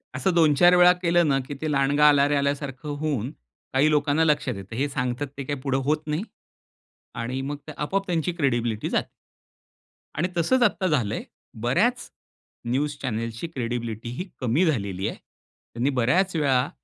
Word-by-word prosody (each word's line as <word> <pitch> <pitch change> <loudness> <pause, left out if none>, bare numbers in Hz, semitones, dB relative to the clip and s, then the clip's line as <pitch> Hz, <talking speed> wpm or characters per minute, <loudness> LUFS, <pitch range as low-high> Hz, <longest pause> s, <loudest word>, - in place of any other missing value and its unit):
असं 135 +8 0
दोन, 160 -3 +5
चार 175 +5 +6
वेळा 180 0 +7
केलं 175 -1 +3
ना, 135 -2 +2
की - - -5
ते 155 -1 -1
"लांडगा 145 +2 +4
आला 140 -1 +4
रे," 145 - +1
आल्यासारखं 140 0 -2
होऊन 140 -5 -2 0.4
काही 140 +3 +4
लोकांना 150 +1 +2
लक्षात 145 -6 +1
येतं. 100 +3 -8
हे 140 +4 0
सांगतात 125 +1 -2
ते 140 - -4
काही 145 0 -4
पुढे 135 -1 0
होत 155 +1 0
नाही. 150 +6 -1 0.9
आणि 125 +3 -3
मग 145 +2 -4
ते - - -6
आपोआप 195 +6 -2
त्यांची 175 0 0
क्रेडिबिलिटी 120 -8 -1
जाते. - - -1 1.1
आणि 175 - +1
तसंच 245 +10 +3
आता 190 -5 +2
झालंय, 120 - 0 0.4
बऱ्याच 215 - +1 0.6
न्यूज 140 +5 -1
चॅनेलची 115 +3 -3
क्रेडिबिलिटी 120 -5 -4
ही 180 - -3
कमी 130 +8 +2
झालेली 100 - -1
आहे. - - -6 0.6
त्यांनी 120 +4 0
बऱ्याच 165 +9 +1
वेळा 135 -4 +2
145 Hz, 165 wpm, -25 LUFS, 125-155 Hz, 1.1 s, वेळा